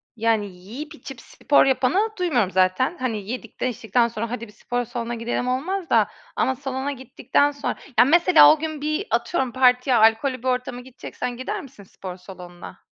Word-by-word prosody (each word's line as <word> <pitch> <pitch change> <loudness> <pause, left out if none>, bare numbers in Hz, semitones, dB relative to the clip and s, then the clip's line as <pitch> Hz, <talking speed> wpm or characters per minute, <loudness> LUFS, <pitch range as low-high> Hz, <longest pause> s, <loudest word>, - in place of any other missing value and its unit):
Yani 225 -2 +1
yiyip 225 - -9
içip 270 -4 -10
spor 285 - +2
yapanı 270 - +2
duymuyorum 255 - +1
zaten. 185 - +1
Hani 220 -6 -3
yedikten 245 0 -4
içtikten 235 0 +1
sonra 230 0 -5
"Hadi, 235 -1 -5
bir - - -15
spor 245 +3 -3
salonuna 240 0 -4
gidelim." 235 +2 -3
olmaz 330 +8 -2
da. - - +4 0.3
Ama 265 - +1
salona 270 +1 -4
gittikten 270 +2 0
sonra 285 -1 -3 0.2
Ya, - - +8
mesela 345 +4 +7
o 310 - -4
gün 310 -1 -4
bir, 305 +7 -2
atıyorum, 265 -8 0
partiye, 250 0 +3
alkollü 225 +4 +3
bir - - -3
ortama 250 -1 -2
gideceksen 250 -1 -7
gider 255 - -4
misin 265 -7 -14
spor 185 -1 -9
salonuna? 180 -1 -12
250 Hz, 170 wpm, -23 LUFS, 225-280 Hz, 0.3 s, Ya